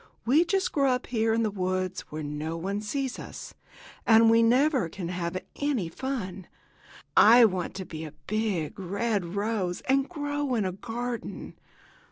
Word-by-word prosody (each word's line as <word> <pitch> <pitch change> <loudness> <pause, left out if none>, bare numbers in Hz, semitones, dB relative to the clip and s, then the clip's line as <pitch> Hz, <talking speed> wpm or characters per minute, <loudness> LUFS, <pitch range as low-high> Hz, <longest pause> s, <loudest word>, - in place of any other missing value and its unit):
We 285 +8 +5
just 385 +2 0
grow 275 -2 +2
up 250 0 0
here 225 -2 0
in 230 +1 +2
the 215 - 0
woods, 185 -1 -2
where 155 +1 -5
no 150 +3 -4
one 195 +4 -3
sees 265 +4 -3
us, - - -8 0.5
and 225 0 +6
we 230 0 +5
never 255 - +3
can 175 0 -6
have 175 0 -3 0.2
any 270 - -1
fun. 195 -5 -5 0.7
I 235 +3 +8
want 185 -3 -1
to 190 -1 -5
be 160 -2 -7
a 155 - -9
big, 200 -6 -2
red 195 -1 -2
rose 200 -4 -1
and 270 +1 +1
grow 290 -5 -2
in 215 -4 +1
a 185 - -1
garden." 235 +5 -5
215 Hz, 165 wpm, -27 LUFS, 185-250 Hz, 0.7 s, I